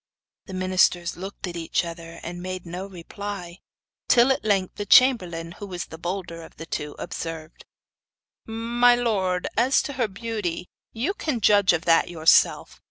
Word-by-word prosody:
The 190 - -7
ministers 185 -2 +2
looked 195 +3 -7
at 175 -2 -6
each 170 +1 -1
other, 165 0 -8
and 175 +1 -6
made 185 0 -5
no 180 +3 -6
reply; 185 0 -7 0.5
till 245 +2 +5
at 265 - 0
length 195 -3 0
the 205 - -3
chamberlain, 180 -11 +4
who 205 - -6
was 180 -2 -5
the 160 - -11
bolder 175 -1 -4
of 160 - -13
the 165 - -7
two, 150 -2 -5
observed: 165 -1 -7 0.8
'My 235 +2 +3
lord, 195 -7 0
as 250 +5 +3
to 285 - -5
her 250 -3 0
beauty, 200 -4 -4 0.2
you 255 - -2
can 300 - -2
judge 205 -2 +5
of 175 0 -1
that 165 -1 +5
for - - -12
yourself. 160 -1 +3
185 Hz, 165 wpm, -24 LUFS, 170-225 Hz, 0.8 s, till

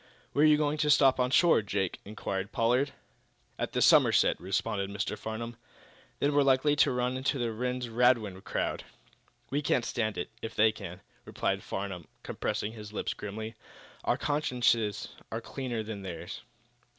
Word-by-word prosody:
"Where 145 - +2
are - - +8
you 150 -1 +6
going 150 0 0
to 150 - +2
stop 135 -2 +5
on 125 0 +2
shore, 165 0 +5
Jake?" 100 -3 -2
inquired 100 -1 -4
Pollard. 125 +5 +2 0.7
"At - - -2
the - - +2
Somerset," - - +5
responded 100 +2 -1
Mr. 100 +1 -2
Farnum. 115 +1 -5 0.6
"Then 145 +1 +1
we're 145 - +5
likely 140 +2 +4
to - - +5
run 125 0 0
into 135 +2 0
that 120 -2 -1
Rhinds 125 +2 -2
Radwin 115 -5 +2
crowd." - - -2 0.7
"We 145 +2 +1
can 130 -4 +1
stand 110 -3 -1
it, - - -4
if 115 - -6
they 110 +1 +5
can," 95 -3 -9 0.2
replied - - -1
Farnum, 95 -4 -5 0.2
compressing 105 - -2
his 105 -2 -9
lips 105 - -2
grimly. 110 +2 -6 0.5
"Our - - +1
consciences 125 -7 +1 0.2
are - - -2
cleaner 120 -4 -4
than 105 -2 -6
theirs." 85 -4 -7
115 Hz, 165 wpm, -30 LUFS, 105-130 Hz, 0.7 s, are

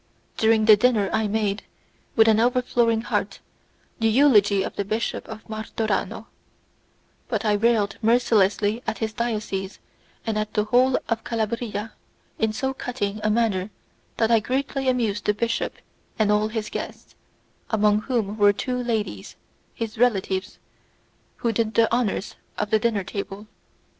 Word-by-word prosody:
During 220 -1 +3
the 215 -1 +9
dinner 210 -3 +2
I 220 -1 +1
made, 210 -1 -1 0.5
with 225 -1 +6
an 220 -1 +5
overflowing 240 -2 +2
heart, - - -2 0.6
the 225 - +2
eulogy 215 -6 +4
of - - -5
the 200 - -1
Bishop 220 +3 -3
of 220 -1 -9
Martorano; 220 -1 -3 1.0
but 220 -2 -2
I 210 - +3
railed 210 -1 +2
mercilessly 220 -2 +2
at - - -1
his 220 -1 -3
diocese 210 -4 -3 0.5
and 220 -2 -1
at 215 0 -4
the 210 - +3
whole 250 +4 +3
of 225 -1 -1
Calabria 225 -1 -3 0.5
in 220 -1 +2
so 265 +5 -2
cutting 225 -6 -3
a 215 - +2
manner 215 -4 +1 0.5
that 225 0 +2
I 230 - +6
greatly 270 +3 -1
amused 225 -5 0
the 210 - +3
archbishop 230 +2 -2 0.4
and 215 -2 +2
all 210 +1 +2
his 220 -1 -4
guests, - - -7 0.6
amongst 210 0 +2
whom 220 -5 -1
were 205 0 +6
two 250 +4 -2
ladies, 215 - -3 0.4
his 225 -1 -5
relatives, 195 -5 +1 0.8
who 235 - -1
did 220 -1 -1
the 230 0 +3
honours 230 -4 0 0.2
of 210 -1 -2
the 220 - +4
dinner 215 -3 0
table. 195 +2 -6
220 Hz, 150 wpm, -24 LUFS, 210-235 Hz, 1.0 s, the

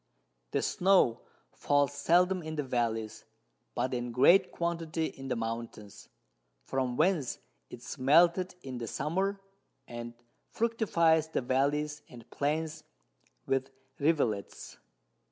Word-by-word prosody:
The - - -1
Snow 180 -11 +3 0.3
falls 145 0 +1
seldom 180 +5 +2
in 155 -1 -6
the 150 - -1
Vallies, 115 -4 -2 0.5
but 125 +2 -1
in 120 -1 -3
great 175 +10 +5
Quantity 165 -1 -2
in 135 -3 -7
the 125 - -1
Mountains, 115 -3 -6 0.5
from 125 - -2
whence 160 -6 +1 0.3
it 120 - -10
is 130 - -8
melted 170 +7 +4
in 130 -2 -6
the 115 - -5
Summer, 190 - -1 0.5
and 120 0 -7 0.3
fructifies 170 -9 +2
the 160 - -2
Vallies 145 +4 0
and 120 -2 -13
Plains 155 +2 -2 0.6
with 135 0 0 0.3
Rivulets. 140 -10 -1
145 Hz, 120 wpm, -30 LUFS, 120-170 Hz, 0.6 s, great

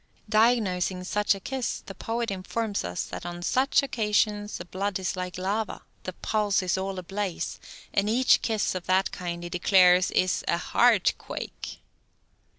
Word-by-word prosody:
Diagnosing 210 -5 +2
such 205 +2 +1
a - - -8
kiss, 260 +4 -3
the 195 - -8
poet 230 +3 -3
informs 200 +3 -2
us 90 0 -3
that - - -7
on 175 0 -6
such 260 +8 +3
occasions 210 -4 0
the - - -8
blood 195 +2 -2
is 190 +1 -2
like 180 -1 -4
lava, 200 +3 -2 0.2
the 185 - -4
pulse 205 0 0
is 185 - +1
all 190 0 -3
ablaze, 190 0 -3 0.3
and 200 +1 +2
each 255 +3 +4
kiss 220 -2 0
of 185 -1 -5
that 190 +1 +2
kind 175 -1 -5
he 175 - -5
declares 180 0 +5
is 185 0 +1
a 170 - +2
"heart 220 +3 +3
quake." - - -7
195 Hz, 160 wpm, -27 LUFS, 180-215 Hz, 0.3 s, declares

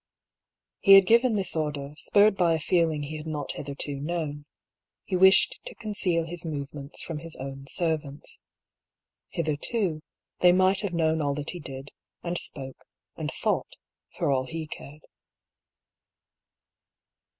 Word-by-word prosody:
He 195 - +7
had 195 -1 +9
given 235 +2 +4
this 190 -4 0
order, 150 -2 -2
spurred 205 +6 +4
by 170 -3 +3
a - - -2
feeling 160 -2 +1
he 155 +2 -5
had 155 +1 -8
not 150 -2 -3
hitherto 140 0 -5
known: 150 -1 -3 0.6
he - - -2
wished 190 - +5
to - - -6
conceal 190 -6 0
his 170 +1 -5
move 145 -4 -5
ments 140 0 -6
from 165 -3 -5
his 165 +1 -7
own 135 +1 -7
servants. 155 -3 -2 0.9
Hitherto, 165 +2 -1 0.4
they 180 0 +6
might 185 +1 +4
have 195 -4 -3
known 160 -1 +2
all 140 -1 0
that 145 +1 -4
he 175 - -7
did, 135 -2 -8 0.3
and 175 0 -2
spoke, 135 -2 -6 0.3
and - - -4
thought, - - -1 0.4
for - - +1
all 130 -1 +1
he 165 +1 -5
cared. 150 0 -10
160 Hz, 145 wpm, -27 LUFS, 145-180 Hz, 0.9 s, had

